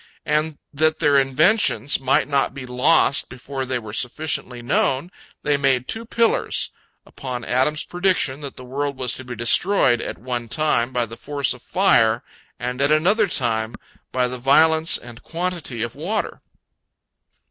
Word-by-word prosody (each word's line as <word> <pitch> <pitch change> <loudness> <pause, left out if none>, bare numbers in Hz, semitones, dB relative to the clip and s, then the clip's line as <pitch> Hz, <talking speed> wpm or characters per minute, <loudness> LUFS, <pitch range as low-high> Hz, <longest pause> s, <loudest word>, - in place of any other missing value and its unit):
And 155 0 0 0.2
that 155 +2 +2
their 145 -3 +3
inventions 145 - +2
might 135 0 +1
not 140 -2 0
be 135 -2 -7
lost 135 +3 +2
before 130 +1 -6
they 130 0 -1
were 110 -3 -8
sufficiently 125 -1 -2
known, 135 +6 0 0.3
they 145 -1 +2
made 135 -3 +1
two 225 +1 -2
pillars, 230 0 0 0.3
upon 125 -3 -7
Adam's 130 +5 +1
prediction 180 -6 0
that 140 -2 -7
the 125 - -11
world 140 +2 -3
was 125 -2 0
to 130 - -8
be 125 -1 -7
destroyed 120 - +4
at - - -5
one 120 +2 -5
time 130 -3 +1
by 125 -2 0
the 115 +1 -10
force 140 0 -1
of 125 - -13
fire 115 - +2 0.4
and 125 +2 -4
at 140 +1 +2
another 195 +8 +3
time 115 -8 0 0.4
by 125 -1 +1
the 125 0 -6
violence 160 +5 +4
and 120 -1 -12
quantity 165 -9 -4
of 120 - -4
water. 190 +9 -3
135 Hz, 160 wpm, -21 LUFS, 125-155 Hz, 0.4 s, destroyed